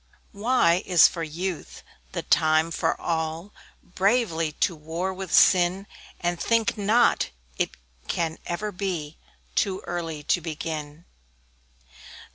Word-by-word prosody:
Y 200 - -15 0.4
Y - - -10
is 180 -3 +7
for 170 - -6
Youth 170 +2 -5 0.3
the - - -3
time 155 +1 +3
for - - -1
all 165 +4 -3 0.3
Bravely 185 -5 +1
to 170 - 0
war 165 +5 -3
with 190 -2 -7
sin; 185 +1 +4 0.3
And 175 -1 -1
think 230 -1 +2
not 220 +3 +3 0.3
it - - -1 0.3
can 165 -2 -2
ever 205 +5 -3
be 180 -6 -4 0.3
Too 195 -2 0
early 165 -3 -5
to 175 - +1
begin. 155 0 -5
175 Hz, 120 wpm, -25 LUFS, 160-190 Hz, 0.4 s, is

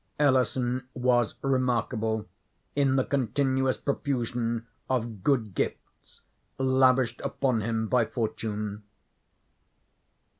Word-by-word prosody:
Ellison 130 -2 +2
was 125 -2 +2
remarkable 120 -4 0 0.5
in 140 -2 +3
the 130 - +3
continuous 130 0 +1
profusion 120 -4 -1 0.2
of 115 -5 -1
good 115 -8 +1
gifts - - -5 0.4
lavished 130 -2 +3
upon 135 -4 0
him 110 +1 -1
by 120 0 +3
fortune. 105 -2 -3
125 Hz, 85 wpm, -28 LUFS, 115-130 Hz, 0.5 s, in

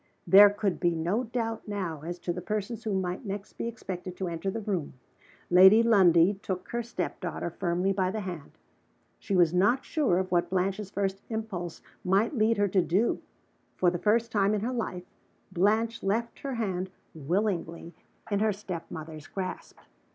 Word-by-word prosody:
There 200 +4 +9
could 205 -2 -2
be 175 -2 +1
no 180 +10 0
doubt 225 -1 -3
now 185 -7 -3
as 175 +3 -5
to 175 - -2
the 180 - -5
persons 215 +3 -3
who 210 -3 0
might 180 +5 -3
next 200 -1 -6
be - - -4
expected 185 -5 -6
to 185 -2 -2
enter 170 +3 -3
the 225 - -3
room. 195 -8 -3 0.6
Lady 190 +5 +8
Lundie 190 -4 +5
took 185 -4 -4
her 235 - -2
step 230 -6 -4
daughter 175 -1 -4
firmly 180 +2 0
by 185 -1 0
the 215 +3 -3
hand. 175 -6 -7 0.7
She 195 - -2
was 175 -2 +4
not 205 +9 +3
sure 280 - +1
of 185 -1 -2
what 175 -1 +2
Blanche's 190 +2 -1
first 195 -1 -2
impulse 210 -7 -5 0.2
might 200 +9 +2
lead 225 -1 +2
her 205 0 +3
to 185 0 +3
do. 190 +7 +1 0.6
For 180 -1 +3
the 175 - -3
first 230 +3 +2
time 205 -1 +2
in 205 - -2
her 245 +4 -2
life, 185 -7 -4 0.5
Blanche 220 +5 +1
left 225 +4 -1
her 275 -2 -4
hand 190 -5 -2 0.2
willingly 170 +1 -2 0.4
in 200 - +2
her 215 0 +2
step 190 -4 -7
mother's 155 -1 -8
grasp. 190 -2 -6
195 Hz, 180 wpm, -28 LUFS, 180-215 Hz, 0.7 s, There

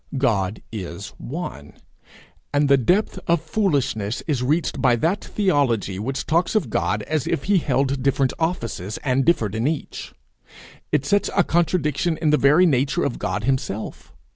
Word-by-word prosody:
God 105 -6 0
is 95 -2 -6
one; 125 - -6 0.8
and 145 0 +2
the 140 - +6
depth 180 - +1
of 170 -1 +3
foolishness 140 - -1
is 145 -6 -1
reached 150 +7 0
by 125 -3 +4
that 165 - 0
theology 130 - 0
which 135 +6 -3
talks 170 +6 +1
of 160 - 0
God 105 0 0
as 155 +1 -2
if - - -1
he 200 -1 +3
held 135 -2 0
different 135 0 +1
offices, 115 - -2
and 135 -1 +2
differed 115 - +2
in 110 +4 0
each. 155 -1 -4 0.8
It 150 -2 +1
sets 200 +6 +2
a - - +6
contradiction 165 -1 0
in 155 -2 +1
the 150 - +4
very 150 +7 +5
nature 140 -4 +1
of - - -2
God 105 +1 -2
himself. 125 -5 -3
140 Hz, 160 wpm, -22 LUFS, 115-160 Hz, 0.8 s, the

